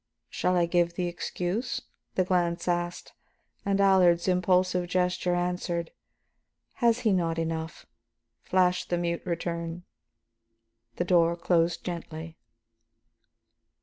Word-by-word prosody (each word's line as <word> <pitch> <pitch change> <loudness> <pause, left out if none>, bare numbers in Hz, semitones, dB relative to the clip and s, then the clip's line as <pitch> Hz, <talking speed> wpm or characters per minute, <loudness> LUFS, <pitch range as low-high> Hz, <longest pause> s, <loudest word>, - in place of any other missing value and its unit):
"Shall 180 0 +1
I 175 - +4
give 170 0 +1
the 180 - -1
excuse?" 180 +6 -3 0.3
the 185 - +3
glance 175 -2 0
asked. 175 0 -2 0.5
And 200 0 0
Allard's 185 -3 +4
impulsive 180 0 +2
gesture 180 0 0
answered. 175 -1 -2 0.9
"Has 235 0 +3
he 215 -4 +3
not 165 -3 0
enough?" 160 0 -3 0.6
flashed 180 -1 +1
the 175 - +1
mute 170 0 -1
return. 170 0 -3 1.1
The 175 - -1
door 170 -1 +4
closed 170 -1 +1
gently. 165 -2 -6
175 Hz, 110 wpm, -28 LUFS, 170-180 Hz, 1.1 s, I